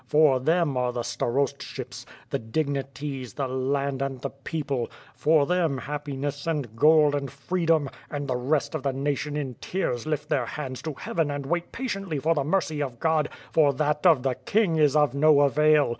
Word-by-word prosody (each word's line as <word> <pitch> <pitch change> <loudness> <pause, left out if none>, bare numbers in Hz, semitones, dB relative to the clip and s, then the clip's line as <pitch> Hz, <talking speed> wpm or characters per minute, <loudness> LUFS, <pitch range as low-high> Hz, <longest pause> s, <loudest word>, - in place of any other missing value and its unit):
For 150 -4 +4
them 160 +1 +2
are 125 -1 +1
the 120 -1 -3
starostships, 135 +4 -3 0.2
the - - 0
dignities, 135 -1 -3
the 140 - -1
land 135 +1 -1
and 135 -1 -2
the 135 - -4
people; 140 -3 -3 0.2
for 155 -2 +3
them 165 -4 +1
happiness, 145 +1 -4
and 145 -9 -2
gold, 150 +3 +5
and 140 -1 -2
freedom; 160 +1 0 0.2
and 145 -1 -4
the 130 - 0
rest 135 +6 0
of 155 - -2
the 135 0 -1
natioTi 145 +2 -2
in 135 -4 -3
tears 155 -9 -2
lift 150 -1 -2
their 135 -6 0
hands 130 -2 -5
to 155 -3 -5
heaven 165 +1 -1
and 145 -1 -3
wait 175 +4 -2
patiently 195 - -3
for 160 +4 +2
the 145 -3 0
mercy 155 -1 0
of 130 -4 -4
God; 160 -2 +2 0.2
for 145 -3 +4
that 150 +2 0
of 155 -7 +5
the 135 -1 +1
King 195 - +1
is 150 -2 +4
of 150 -4 +4
no 145 +1 +5
avail! 150 0 +4
145 Hz, 185 wpm, -26 LUFS, 135-155 Hz, 0.2 s, gold